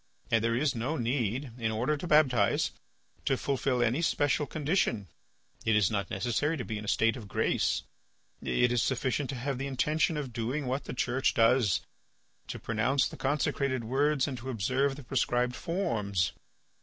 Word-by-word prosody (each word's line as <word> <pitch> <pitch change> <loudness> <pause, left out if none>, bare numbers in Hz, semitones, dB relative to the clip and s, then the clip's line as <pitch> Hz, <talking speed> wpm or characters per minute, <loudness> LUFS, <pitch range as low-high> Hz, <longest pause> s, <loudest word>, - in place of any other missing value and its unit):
And 115 -1 +3
there 115 0 +1
is 140 +2 +1
no 125 +7 -2
need, 120 +1 -1
in 115 -1 0
order 120 +7 0
to 165 +4 -6
baptize, 130 -10 +3 0.5
to 135 - +2
fulfil 130 -2 0
any 120 +7 +1
special 145 -3 +1
condition; 145 - 0 0.6
it 110 - +2
is 105 -2 +3
not 100 -3 -1
necessary 145 +7 0
to 125 - -4
be 110 -2 -4
in 105 - -7
a - - -9
state 115 +3 +2
of 115 -5 -8
grace; - - 0 0.6
it 70 - +2
is 120 -2 +2
sufficient 130 +1 0
to 140 - -3
have 130 +1 -3
the 135 - -2
intention 150 +5 +1
of 135 -5 -4
doing 125 +5 -2
what 130 +3 -2
the - - -5
Church 130 +1 +1
does, 115 -4 +4 0.7
to - - -5
pronounce 120 +5 +1
the - - -9
consecrated 135 -2 0
words 135 +4 +1
and 130 -3 -4
to 130 +3 -7
observe 130 +5 0
the 145 - -10
prescribed 125 0 0
forms. 110 - -1
125 Hz, 175 wpm, -30 LUFS, 115-140 Hz, 0.7 s, does